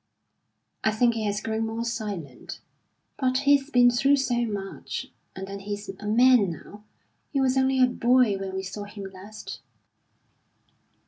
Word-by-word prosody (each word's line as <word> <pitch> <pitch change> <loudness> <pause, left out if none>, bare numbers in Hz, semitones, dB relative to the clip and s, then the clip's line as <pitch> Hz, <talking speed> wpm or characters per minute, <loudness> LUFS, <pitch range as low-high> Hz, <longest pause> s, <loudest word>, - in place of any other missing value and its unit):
"I - - +4
think 235 +2 +2
he 225 -1 -3
has 205 0 -1
grown 225 0 -2
more 225 +1 -3
silent. 205 - -5 0.6
But 255 -2 +2
he's 285 0 +4
been 245 -3 +5
through 275 +4 +4
so 245 -3 0
much. 200 -2 -5 0.3
And 190 - -5
then 200 +1 -7
he's 205 +1 -6
a 210 - -6
man 240 -2 +5
now; 205 +6 -11 0.5
he 275 - 0
was 260 -1 +2
only 265 0 +2
a 255 - +7
boy 245 -3 +3
when 190 -1 -5
we 190 - -3
saw 195 +2 -6
him 205 0 -9
last." 200 +3 -9
220 Hz, 155 wpm, -26 LUFS, 205-255 Hz, 0.6 s, a